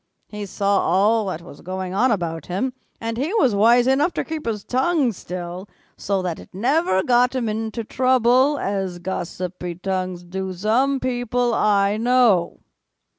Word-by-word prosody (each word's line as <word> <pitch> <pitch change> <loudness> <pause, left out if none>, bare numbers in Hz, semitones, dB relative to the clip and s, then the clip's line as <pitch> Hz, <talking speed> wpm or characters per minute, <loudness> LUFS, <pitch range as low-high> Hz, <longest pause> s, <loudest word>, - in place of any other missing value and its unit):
He 210 -1 -6
saw 200 +1 +1
all 205 +5 +2
that 170 -3 -4
was 145 - -13
going 185 0 -5
on 235 +7 +3
about 170 - -2
him, 205 +9 -2 0.3
and 230 0 -4
he 305 - -1
was 265 - +3
wise 235 +4 +5
enough 285 +7 +2
to - - -1
keep 315 -5 -6
his 210 -3 -2
tongue 265 0 +1
still, 180 0 -7 0.3
so 195 -1 -2
that 175 -3 -3
it - - -13
never 235 - +1
got 250 +1 +3
him 245 -3 -1
into 220 +1 -3
trouble 255 +4 +3
as 195 -5 -2
gossipy 180 0 -5
tongues 185 -1 -3
do 190 +1 -5
some 240 +9 +1
people 245 -1 -1
I 205 -1 +2
know." 230 -6 +2
210 Hz, 160 wpm, -22 LUFS, 185-250 Hz, 0.3 s, wise